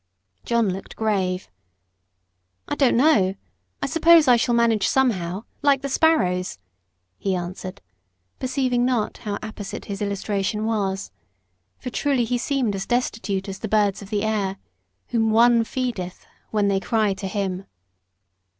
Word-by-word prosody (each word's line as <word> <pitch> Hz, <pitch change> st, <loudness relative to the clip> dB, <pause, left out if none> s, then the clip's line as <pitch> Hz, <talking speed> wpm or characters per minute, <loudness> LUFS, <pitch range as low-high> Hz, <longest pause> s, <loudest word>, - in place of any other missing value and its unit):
John 235 Hz, -3 st, +2 dB
looked 190 Hz, -, -8 dB
grave. 190 Hz, -4 st, -1 dB, 1.2 s
"I -, -, -2 dB
don't 265 Hz, -4 st, +3 dB
know: 215 Hz, -9 st, +4 dB, 0.5 s
I -, -, +2 dB
suppose 330 Hz, -1 st, +5 dB
I 250 Hz, -, +7 dB
shall 240 Hz, 0 st, +1 dB
manage 230 Hz, -4 st, +3 dB
somehow 200 Hz, -7 st, +1 dB, 0.2 s
like 280 Hz, -2 st, +3 dB
the 280 Hz, -, -2 dB
sparrows," 185 Hz, -, +2 dB, 0.6 s
he 195 Hz, -1 st, 0 dB
answered, 180 Hz, -, -6 dB, 0.6 s
perceiving 255 Hz, -2 st, 0 dB
not 245 Hz, -4 st, 0 dB
how 205 Hz, -1 st, -3 dB
apposite 215 Hz, -2 st, -6 dB
his 200 Hz, 0 st, -5 dB
illustration 200 Hz, +1 st, -1 dB
was. 195 Hz, -, -1 dB, 0.7 s
For 250 Hz, -, -6 dB
truly 270 Hz, -1 st, +1 dB
he 245 Hz, +1 st, -1 dB
seemed 255 Hz, -5 st, 0 dB
as 195 Hz, 0 st, -4 dB
destitute 220 Hz, -5 st, -1 dB
as 195 Hz, 0 st, -6 dB
the 220 Hz, -, -4 dB
birds 205 Hz, -2 st, +2 dB
of 200 Hz, -, -10 dB
the 210 Hz, -1 st, -1 dB
air, 205 Hz, -3 st, -1 dB, 0.5 s
whom 225 Hz, -2 st, +1 dB
ONE 230 Hz, +1 st, +5 dB
feedeth, 225 Hz, -9 st, -4 dB, 0.2 s
when 210 Hz, -2 st, +1 dB
they 195 Hz, -1 st, +2 dB
cry 215 Hz, 0 st, +1 dB
to 195 Hz, 0 st, -5 dB
Him. 190 Hz, -1 st, -3 dB
215 Hz, 140 wpm, -23 LUFS, 195-245 Hz, 1.2 s, I